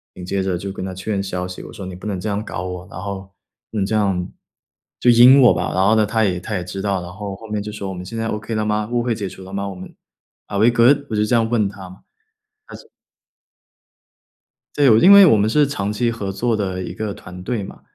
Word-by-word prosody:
紧 90 - -8
接 95 +1 -1
着 95 -2 -1
就 100 +2 -5
跟 95 -1 -6
他 95 - -5
确 95 +4 -5
认 100 -2 0
消 90 -2 -3
息， 90 - -8
我 - - -11
说： 95 - -8
“你 95 - -7
不 90 - -8
能 100 -3 -2
这 105 - -4
样 100 +1 -2
搞 90 - -5
我， 90 0 -6
然 90 - -7
后 100 -1 -7 0.4
不 110 - -5
能 100 - +1
这 105 - -3
样， 95 -4 0 0.7
就 125 - +3
阴 125 +3 +8
我 125 - +7
吧。” 90 +1 -2
然 95 +1 +2
后 110 +3 +4
呢， 110 -1 +3
他 110 +2 0
也 90 -3 -1
他 105 +4 -5
也 90 - -2
知 90 +2 -6
道， 100 -2 -1
然 90 0 -8
后 100 0 -6
后 110 +4 -12
面 105 -1 -3
就 105 - -6
说： 105 -2 -6
“我 - - -5
们 90 0 -7
现 115 +5 -7
在 115 0 -2
okay 110 +1 -4
了 110 0 -1
吗？ 105 0 -1
误 120 -1 0
会 120 -1 0
解 100 -2 -4
除 95 +1 -11
了 95 - -11
吗？ 100 0 -3
我 95 - -8
们， 90 +1 -10 0.5
Are 100 - -3
we 110 +3 +5
good？” 125 +4 +4
我 - - -1
就 105 - +2
这 120 - +1
样 115 -1 +2
问 110 -4 +1
他 95 -2 -11
嘛， 95 +2 -15 0.7
他 - - -9
说 - - -14 1.9
对， 145 -2 +5
我 110 - +6
因 190 +10 +8
为 200 -1 +10
我 130 -11 +5
们 105 +1 +2
是 145 +6 +3
长 105 -8 -3
期 115 +2 0
合 105 -4 -5
作 115 +5 0
的 95 -3 -3
一 - - -6
个 110 -2 -4
团 90 -1 -11
队 105 +2 -3
嘛。 - - -11
100 Hz, 325 characters per minute, -20 LUFS, 95-110 Hz, 1.9 s, 为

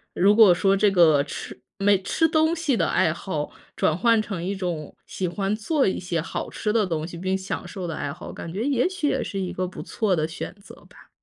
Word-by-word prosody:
如 200 +3 +5
果 220 -4 +8
说 195 +2 +3
这 205 +1 +4
个 160 -6 +5
吃 140 -3 -8 0.2
没 200 -1 +4
吃 325 - +2
东 315 +1 +2
西 320 -6 0
的 - - +1
爱 155 - +2
好， 160 -4 -4 0.2
转 155 - +1
换 230 +3 +4
成 195 -6 -5
一 190 +3 -1
种 175 -6 -4
喜 185 - -3
欢 195 +3 -1
做 270 +6 +1
一 190 - 0
些 175 -2 -2
好 160 - -4
吃 210 -2 -2
的 225 -2 +3
东 160 -3 -2
西 175 - -9
并 190 +2 -1
享 190 0 -5
受 185 -3 -6
的 165 - -4
爱 145 - -3
好， - - -9
感 165 - -7
觉 200 +6 -3
也 270 -3 +2
许 370 -5 -2
也 - - 0
是 195 - -4
一 185 -2 -3
个 185 - -2
不 180 - -7
错 215 -4 -1
的 155 -1 0
选 165 - -6
择 - - -13
吧。 - - -18
190 Hz, 255 characters per minute, -24 LUFS, 170-215 Hz, 0.2 s, 果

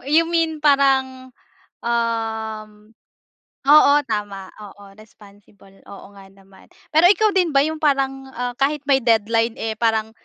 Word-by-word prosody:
You 330 - +5
mean 330 -2 -1
parang, 265 -3 +1 0.5
um 225 -2 -3 0.9
oo 285 0 +6 0.2
tama, 205 -3 -5
oo 205 -1 -13
responsible 205 -2 -20
oo 200 -1 -12
nga 195 -1 -15
naman. 195 -1 -21 0.3
Pero 320 +3 +4
ikaw 425 +2 +3
din 355 -4 +1
ba 275 - +5
yung 315 0 -4
parang, 270 -2 -1
ah, 245 0 -4
kahit 290 +1 -1
may 270 -1 +3
deadline 225 0 +1
eh 220 -1 -4
parang, 220 -1 0
235 Hz, 135 wpm, -20 LUFS, 215-280 Hz, 0.9 s, oo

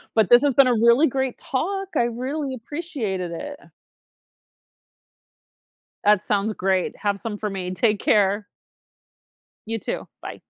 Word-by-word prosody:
But 220 -4 +3
this 240 0 +8
has 280 -3 +2
been 275 0 +6
a 245 - +3
really 235 +7 +5
great 265 -1 -2
talk, 390 +8 -3
I 240 - +3
really 260 +4 -3
appreciated 230 - -4
it, 285 - -6
uh. - - -19 2.4
That 210 -2 +4
sounds 210 +1 0
great, 190 -1 0
have 200 -1 -1
some 215 -2 -5
for 210 - -2
me; 185 -2 -4
take 210 +3 +1
care. 205 0 +2 1.2
You, 225 0 -2
too. - - -5
Bye. - - -8
225 Hz, 145 wpm, -23 LUFS, 205-270 Hz, 2.4 s, this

